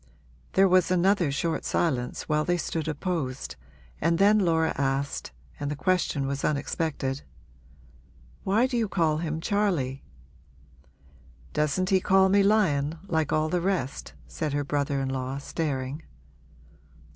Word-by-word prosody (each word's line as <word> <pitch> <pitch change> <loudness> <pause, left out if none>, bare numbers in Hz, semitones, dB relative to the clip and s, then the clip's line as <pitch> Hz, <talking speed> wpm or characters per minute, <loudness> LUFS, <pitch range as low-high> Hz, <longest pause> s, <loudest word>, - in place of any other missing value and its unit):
There 195 +1 +5
was 185 -1 +4
another 185 -3 +3
short 160 +4 -1
silence 125 -7 -1
while 150 0 +1
they 175 +2 +1
stood 160 -2 -3
opposed, 145 - -3 0.5
and 165 +1 +2
then 205 +3 +5
Laura 165 -4 +2
asked 140 0 -1 0.3
and 145 -1 -2
the 150 - -2
question 165 -4 0
was 140 0 -3
unexpected 140 -2 -1 1.2
'Why 215 +6 +3
do 255 -2 -1
you 225 -3 0
call 160 -5 +1
him 155 -1 -3
Charley?' 165 -9 0 1.5
'Doesn't 150 +5 0
he 190 - +5
call 190 0 +4
me 200 +1 +5
Lion, 165 -8 +2
like 160 -4 0
all 155 0 +2
the 180 +2 0
rest?' 175 -8 -2
said 155 -3 -3
her 145 0 0
brother 140 0 -1
in 135 - -2
law, 130 0 -3
staring. 140 -1 -3
160 Hz, 135 wpm, -27 LUFS, 140-185 Hz, 1.5 s, There